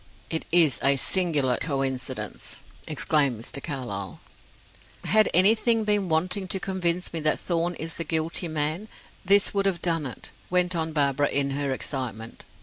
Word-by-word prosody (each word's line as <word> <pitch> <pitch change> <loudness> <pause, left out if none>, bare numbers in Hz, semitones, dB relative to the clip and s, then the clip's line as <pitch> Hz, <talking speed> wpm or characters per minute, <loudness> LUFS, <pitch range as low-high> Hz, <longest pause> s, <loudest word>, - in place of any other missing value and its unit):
"It 160 - -2
is 160 -7 +4
a 140 +1 +3
singular 145 -5 +2
coincidence," 135 -4 -2 0.2
exclaimed 140 -7 +1
Mr. 130 +4 -5
Carlyle. 120 - -6 0.8
"Had 215 0 +3
anything 220 +5 +4
been 205 -3 0
wanting 185 +5 0
to 190 - -2
convince 180 -2 -1
me 165 - -3
that 155 0 0
Thorn 175 0 -1
is 160 +1 -6
the 165 - -3
guilty 160 +2 0
man, 155 +6 -2 0.4
this 200 +1 +4
would 200 -1 +1
have 185 -3 -1
done 165 -4 +1
it," 125 - -9 0.2
went 180 0 +2
on 160 -1 -1
Barbara, 145 -2 +1
in 140 0 +2
her 140 0 -2
excitement. 125 -4 -5
160 Hz, 150 wpm, -25 LUFS, 140-180 Hz, 0.8 s, is